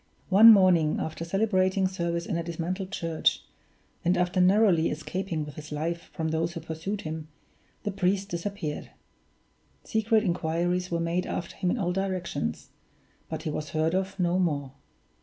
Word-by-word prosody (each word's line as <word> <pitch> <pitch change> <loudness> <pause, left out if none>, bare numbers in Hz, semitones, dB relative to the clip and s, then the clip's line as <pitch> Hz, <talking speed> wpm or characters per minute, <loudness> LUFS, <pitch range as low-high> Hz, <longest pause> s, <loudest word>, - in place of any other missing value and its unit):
One 215 +4 +9
morning, 180 -7 +5
after 160 +1 -4
celebrating 190 0 +2
service 170 -2 -2
in - - -2
a 170 - 0
dismantled 175 +3 -4
church, 165 -4 0 0.6
and 175 +1 +2
after 180 +1 +1
narrowly 185 -3 +4
escaping 165 +1 -3
with 150 -1 -10
his 155 0 -9
life 165 +3 -3
from 160 -1 -2
those 165 +2 -1
who 165 - -5
pursued 165 +6 -4
him, 155 0 -5 0.6
the 205 - -1
priest 195 +1 0
disappeared. 170 -3 -4 0.9
Secret 220 -1 +2
inquiries 175 0 0
were 170 - -1
made 170 +2 -1
after 170 - -4
him 180 - -1
in 245 - 0
all 180 -5 0
directions; 180 - -3 0.6
but 160 -1 -5
he 155 - -2
was 150 0 -4
heard 160 +1 0
of 190 +1 -2
no 180 +1 +2
more. 145 -7 0
175 Hz, 160 wpm, -27 LUFS, 160-190 Hz, 0.9 s, One